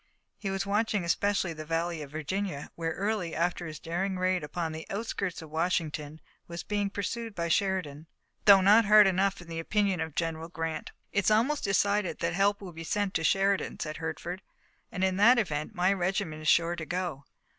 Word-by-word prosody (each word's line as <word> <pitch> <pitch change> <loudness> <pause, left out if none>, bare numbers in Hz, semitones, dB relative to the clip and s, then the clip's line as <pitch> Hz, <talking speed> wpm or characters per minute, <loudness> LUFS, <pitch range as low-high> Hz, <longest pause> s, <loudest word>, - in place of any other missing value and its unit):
He 200 - -3
was 195 0 -2
watching 210 -1 0
especially 195 0 +1
the 155 -1 -7
Valley 165 +1 -2
of 145 - -7
Virginia, 155 +1 -4
where 165 -1 -3
Early, 200 -3 -2
after 175 +1 -1
his 155 -1 -7
daring 185 +5 -2
raid 185 -2 +1
upon 160 +2 -3
the 160 0 -7
outskirts 195 -5 -3
of 155 - -12
Washington, 160 -2 -1 0.3
was 170 0 -6
being 205 -1 -1
pursued 215 +2 -4
by 170 -1 -2
Sheridan, 165 -5 0 0.4
though 200 -2 +9
not 210 +4 +6
hard 210 0 +8
enough 195 +1 +2
in 175 - -13
the 165 -1 -5
opinion 195 0 0
of 160 -2 -4
General 165 0 -2
Grant. 165 -2 -4 0.2
"It's 200 -3 +2
almost 240 +8 +2
decided 200 -1 +1
that 170 -1 -1
help 200 +3 +2
will 185 -3 -8
be 165 +1 -7
sent 200 +3 -1
to 165 - 0
Sheridan," 195 +4 +1
said 155 -1 -4
Hertford, 165 +3 -5 0.5
"and 185 - -3
in 190 0 +1
that 235 +5 +6
event 155 -9 -2
my 185 +2 +3
regiment 180 -4 -2
is 155 - -5
sure 170 +1 +4
to 165 -2 -6
go. 175 -6 -3
180 Hz, 190 wpm, -29 LUFS, 165-200 Hz, 0.5 s, though